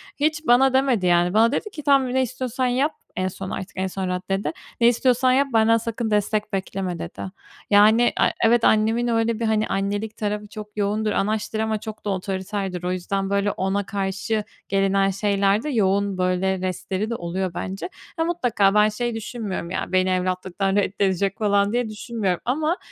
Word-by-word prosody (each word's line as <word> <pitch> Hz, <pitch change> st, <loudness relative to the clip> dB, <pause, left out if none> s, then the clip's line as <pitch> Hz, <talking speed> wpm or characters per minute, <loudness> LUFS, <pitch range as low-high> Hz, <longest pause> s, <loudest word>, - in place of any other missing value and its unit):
Hiç 305 Hz, +2 st, -1 dB
bana 260 Hz, +2 st, +5 dB
demedi 260 Hz, -7 st, +2 dB
yani 175 Hz, 0 st, +3 dB
bana 225 Hz, +2 st, +4 dB
dedi 425 Hz, -, -2 dB
ki, 310 Hz, -7 st, -9 dB
"Tamam 275 Hz, -3 st, +3 dB
ne 260 Hz, -, +3 dB
istiyorsan 255 Hz, 0 st, -2 dB
yap." 265 Hz, +5 st, +1 dB, 0.2 s
En 185 Hz, -, 0 dB
son 190 Hz, +1 st, -6 dB
artık, 190 Hz, -, -5 dB
en 190 Hz, 0 st, 0 dB
son 190 Hz, 0 st, -4 dB
raddede. 180 Hz, -2 st, -2 dB, 0.3 s
"Ne 235 Hz, -, +7 dB
istiyorsan 250 Hz, +1 st, +3 dB
yap, 275 Hz, +2 st, +3 dB
benden 225 Hz, 0 st, +5 dB
sakın 230 Hz, 0 st, -3 dB
destek 210 Hz, 0 st, 0 dB
bekleme." 190 Hz, -2 st, -3 dB
dedi. -, -, -7 dB, 0.5 s
Yani, 215 Hz, +4 st, +5 dB
a -, -, +5 dB, 0.2 s
evet, 230 Hz, +1 st, +4 dB
annemin 225 Hz, +3 st, +3 dB
öyle 230 Hz, -1 st, +1 dB
bir, 230 Hz, -, -1 dB
hani, 220 Hz, -1 st, +1 dB
annelik 205 Hz, +2 st, -2 dB
tarafı 210 Hz, 0 st, -3 dB
çok 210 Hz, 0 st, -10 dB
yoğundur, 210 Hz, +1 st, 0 dB
anaçtır 215 Hz, +2 st, -1 dB
ama 220 Hz, -1 st, 0 dB
çok 215 Hz, 0 st, -9 dB
da 205 Hz, -, -1 dB
otoriterdir. 190 Hz, -1 st, -3 dB
O 180 Hz, -, -1 dB
yüzden 195 Hz, +2 st, -2 dB
böyle 200 Hz, 0 st, +1 dB
ona 195 Hz, +1 st, -1 dB
karşı 200 Hz, +3 st, -2 dB, 0.3 s
gelinen 195 Hz, 0 st, +2 dB
şeylerde 200 Hz, +5 st, +1 dB
yoğun 200 Hz, -5 st, +1 dB
böyle 185 Hz, +1 st, +1 dB
restleri 185 Hz, +3 st, -3 dB
de 235 Hz, -, -2 dB
oluyor 185 Hz, 0 st, -3 dB
bence. 190 Hz, -, -5 dB, 0.3 s
Ya, 325 Hz, -, +2 dB
mutlaka 245 Hz, -, +2 dB
ben 210 Hz, 0 st, +5 dB
şey 235 Hz, +2 st, -3 dB
düşünmüyorum 215 Hz, -6 st, -5 dB
ya, -, -, -3 dB
beni 185 Hz, 0 st, +2 dB
evlatlıktan 185 Hz, +1 st, -1 dB
reddedecek 195 Hz, -1 st, 0 dB
falan 205 Hz, 0 st, +2 dB
diye 245 Hz, -2 st, 0 dB
düşünmüyorum 210 Hz, -4 st, -2 dB
ama, 310 Hz, +7 st, 0 dB
205 Hz, 175 wpm, -23 LUFS, 190-230 Hz, 0.5 s, Ne